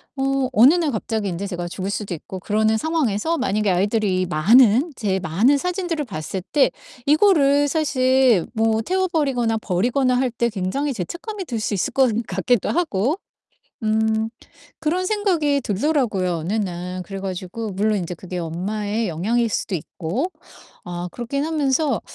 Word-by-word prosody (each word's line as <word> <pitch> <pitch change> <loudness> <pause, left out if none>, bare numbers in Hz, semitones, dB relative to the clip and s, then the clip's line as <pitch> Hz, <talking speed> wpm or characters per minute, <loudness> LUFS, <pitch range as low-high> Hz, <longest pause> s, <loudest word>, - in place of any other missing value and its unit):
어 270 -1 0
어느 250 +8 +7
날 335 -4 +1
갑자기 220 -2 -2
인제 190 +2 -3
제가 175 -3 -4
죽을 190 +2 -4
수도 200 -2 -3
있고 185 +3 -7
그러는 215 +3 +1
상황에서 320 0 0
만약에 215 -5 0
아이들이 190 0 +1
많은, 230 - +4
제 195 -4 -1
많은 200 - +3
사진들을 350 -2 -2
봤을 190 -3 -5
때 285 -3 +4 0.3
이거를 290 -3 +4
사실 260 - +3
뭐 225 0 +2
태워 375 +8 0
버리거나 255 -9 +1
버리거나 245 +7 +1
할 255 -2 +1
때 235 0 0
굉장히 225 +9 -2
죄책감이 360 - -5
들 235 -6 -3
수 215 - -2
있을 190 - -1
것 265 -2 +4 0.2
같기도 195 +5 0
하고. 305 - 0 0.7
음 220 0 +1 0.5
그런 335 +4 0
생각이 345 -10 +1
들더라고요, 210 - 0
어느 170 +7 -3
날. 180 -3 -3
그래 195 +2 -7
가지고 190 +3 -5
물론 210 +2 +1
인제 180 0 -4
그게 180 +1 -7
엄마의 205 +6 -2
영향일 225 +8 0
수도 200 - -2
있고. 185 - -3 0.5
아 175 0 -5
그렇긴 275 +4 -3
하면서 295 -4 +1
225 Hz, 325 characters per minute, -22 LUFS, 190-280 Hz, 0.7 s, 어느